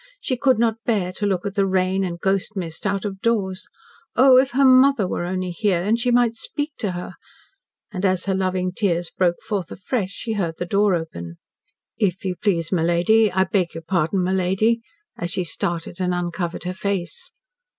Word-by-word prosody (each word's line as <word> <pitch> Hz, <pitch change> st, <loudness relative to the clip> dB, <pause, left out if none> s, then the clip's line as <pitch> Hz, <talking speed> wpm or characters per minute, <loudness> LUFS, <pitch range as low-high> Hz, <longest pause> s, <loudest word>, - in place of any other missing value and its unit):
She 260 Hz, -, -2 dB
could 260 Hz, -1 st, +3 dB
not 225 Hz, 0 st, 0 dB
bear 200 Hz, -6 st, 0 dB
to 205 Hz, +2 st, -2 dB
look 190 Hz, -2 st, -1 dB
at 200 Hz, -, -2 dB
the 195 Hz, -2 st, +1 dB
rain 190 Hz, 0 st, +1 dB
and 170 Hz, -2 st, -4 dB
ghost 195 Hz, +3 st, 0 dB
mist 165 Hz, +1 st, -4 dB
out 195 Hz, +1 st, -1 dB
of 195 Hz, -1 st, -5 dB
doors. 200 Hz, -5 st, -1 dB, 0.5 s
Oh, 260 Hz, 0 st, +7 dB
if 265 Hz, +1 st, +2 dB
her 275 Hz, +2 st, +4 dB
mother 260 Hz, -4 st, +5 dB
were 175 Hz, -, -2 dB
only 185 Hz, 0 st, -2 dB
here, 175 Hz, -1 st, 0 dB
and 220 Hz, +4 st, +1 dB
she 245 Hz, +1 st, 0 dB
might 240 Hz, -1 st, +3 dB
speak 290 Hz, +6 st, -4 dB
to 205 Hz, -5 st, -2 dB
her! 175 Hz, 0 st, -6 dB, 0.8 s
And 190 Hz, -2 st, -5 dB
as 185 Hz, -2 st, +1 dB
her 195 Hz, -, 0 dB
loving 185 Hz, -1 st, 0 dB
tears 175 Hz, -3 st, -1 dB
broke 175 Hz, -2 st, +1 dB
forth 195 Hz, -7 st, -3 dB
afresh, 195 Hz, +1 st, -2 dB
she 225 Hz, +3 st, -5 dB
heard 175 Hz, -6 st, -2 dB
the 175 Hz, -, -3 dB
door 200 Hz, +1 st, +2 dB
open. 85 Hz, -, -6 dB, 0.6 s
"If 190 Hz, -3 st, 0 dB
you 185 Hz, -1 st, -1 dB
please, 170 Hz, -5 st, 0 dB
my 180 Hz, -4 st, +2 dB
lady 180 Hz, +6 st, +3 dB
I 190 Hz, 0 st, +3 dB
beg 190 Hz, -3 st, -1 dB
your 165 Hz, -, -6 dB
pardon, 175 Hz, +2 st, 0 dB
my 185 Hz, +1 st, 0 dB
lady," 195 Hz, +5 st, +1 dB, 0.4 s
as 175 Hz, -, -2 dB
she 180 Hz, +1 st, -1 dB
started 175 Hz, 0 st, -3 dB
and 180 Hz, -1 st, +1 dB
uncovered 175 Hz, -1 st, -3 dB
her 180 Hz, +1 st, -3 dB
face. 200 Hz, -, -4 dB
190 Hz, 200 wpm, -22 LUFS, 175-215 Hz, 0.8 s, Oh